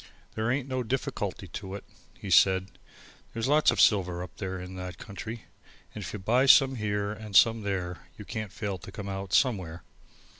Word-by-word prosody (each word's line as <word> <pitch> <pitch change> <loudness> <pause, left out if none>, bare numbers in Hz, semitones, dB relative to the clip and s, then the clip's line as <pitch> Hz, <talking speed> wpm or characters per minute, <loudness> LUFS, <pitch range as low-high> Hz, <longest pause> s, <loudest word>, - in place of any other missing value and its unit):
"There 110 +1 -1
ain't 135 +1 0
no 130 -1 -2
difficulty 120 -6 -3
to 95 +3 -6
it," 100 - -8 0.4
he - - -6
said, 95 0 +4 0.6
"there's 115 +2 -2
lots 150 +2 +4
of - - +1
silver 90 -4 +3
up 90 - -11
there 95 -2 -4
in 90 +1 -8
that 90 0 -6
country 110 +2 -8 0.5
and - - -6
if - - -6
you - - -5
buy 120 +7 +2
some 135 -2 +7
here 105 -1 -1
and 110 -2 -8
some 115 +5 +6
there 95 -3 -4
you 105 - -9
can't 110 -3 -5
fail 100 -2 -4
to 95 - -10
come 100 0 -7
out 95 -1 -5
somewhere. 95 - +1
100 Hz, 190 wpm, -28 LUFS, 95-115 Hz, 0.6 s, some